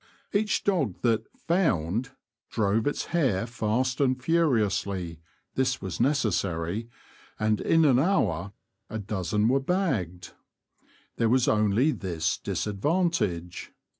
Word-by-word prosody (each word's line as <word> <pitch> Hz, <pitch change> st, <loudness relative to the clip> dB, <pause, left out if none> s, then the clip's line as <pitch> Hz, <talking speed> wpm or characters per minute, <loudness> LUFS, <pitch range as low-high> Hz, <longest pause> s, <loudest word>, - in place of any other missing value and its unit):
Each 210 Hz, +1 st, +1 dB
dog 150 Hz, -, +1 dB
that 115 Hz, -3 st, +1 dB, 0.2 s
''found" 120 Hz, -, +1 dB, 0.4 s
drove 110 Hz, +1 st, +1 dB
its 145 Hz, -, -1 dB
hare 125 Hz, -, +2 dB
fast 125 Hz, +3 st, -1 dB
and 130 Hz, -2 st, +2 dB
furiously 105 Hz, -, 0 dB, 0.3 s
(this 130 Hz, -1 st, 0 dB
was 95 Hz, -3 st, -5 dB
necessary), 110 Hz, -, 0 dB, 0.5 s
and, 110 Hz, -1 st, +1 dB
in 165 Hz, -1 st, +4 dB
an 130 Hz, -4 st, +5 dB
hour, 105 Hz, -, +1 dB, 0.4 s
a 110 Hz, -, -4 dB
dozen 105 Hz, 0 st, -1 dB
were 135 Hz, +3 st, +3 dB
bagged. 125 Hz, -, -2 dB, 0.8 s
There 115 Hz, -1 st, +2 dB
was 125 Hz, +1 st, +3 dB
only 110 Hz, +7 st, +3 dB
this 85 Hz, -, -2 dB
disadvantage. 105 Hz, -, -1 dB
110 Hz, 110 wpm, -27 LUFS, 95-140 Hz, 0.8 s, an